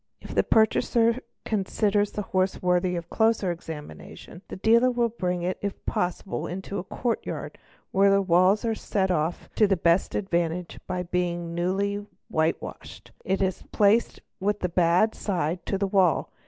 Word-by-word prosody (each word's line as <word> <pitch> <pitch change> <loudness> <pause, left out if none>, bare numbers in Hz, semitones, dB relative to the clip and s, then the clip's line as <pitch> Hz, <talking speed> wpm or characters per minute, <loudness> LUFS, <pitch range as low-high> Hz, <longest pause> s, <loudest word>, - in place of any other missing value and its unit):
E - - -18
If - - -7
the - - +4
purchaser 230 +2 +3 0.3
consider 205 0 +1
the 210 0 -5
horse 185 0 0
worthy 180 0 +1
of 170 -1 -6
closer 220 -4 +2
examination, 165 +1 -9
thal - - -6
dealer 235 +1 +4
brings 180 -5 -2
it 185 +1 -2
if 200 -1 -5
possible 180 +2 -2
into 190 +2 -5
a - - -4
courtyard 235 +4 -4 0.3
where 195 +1 +4
the 195 0 +4
walls 185 +3 +3 0.2
set 190 -2 0
it - - +3
off 160 +1 -2
to 215 - +4
the 195 -1 +2
best 170 +2 +2
advantage 175 -3 -2
by 180 -1 -2
being 175 -1 -2
newly 195 +4 -1 0.3
whitewashed. 160 +1 -3
It 190 +1 0
is 190 -1 -1
placed 215 +3 +2 0.2
with 205 +2 -1
the 180 - 0
bad 175 +5 +3
side 175 -3 -2
to 195 - 0
the 200 - 0
wall. 190 -3 +2
190 Hz, 160 wpm, -26 LUFS, 175-205 Hz, 0.3 s, the